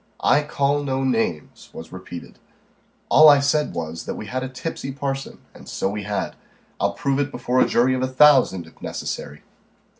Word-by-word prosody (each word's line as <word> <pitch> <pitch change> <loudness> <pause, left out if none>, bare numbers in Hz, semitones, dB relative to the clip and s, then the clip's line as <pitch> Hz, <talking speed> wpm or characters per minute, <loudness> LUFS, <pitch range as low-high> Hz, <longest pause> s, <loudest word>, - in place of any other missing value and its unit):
"I 145 - +4
call 145 -1 0
no 135 -1 -2
names," 115 - -2
was 80 - -10
repeated. 90 -2 -10 0.7
"All 155 +1 +8
I 145 -1 +7
said 145 +2 0
was, 80 0 -5
that - - -4
we - - -7
had 130 +5 -3
a 130 - -4
tipsy 135 +1 -5
parson 135 0 -4 0.2
and - - -13
so - - -1
we 105 -1 -5
had. 105 0 -3 0.4
I'll - - +1
prove 140 -1 -1
it 145 0 0
before 125 0 0
a - - +4
jury 125 +2 +3
of 130 - -1
a 130 - +1
thousand, 130 - +4
if 80 - -19
necessary." 75 +1 -6
130 Hz, 185 wpm, -22 LUFS, 105-140 Hz, 0.7 s, All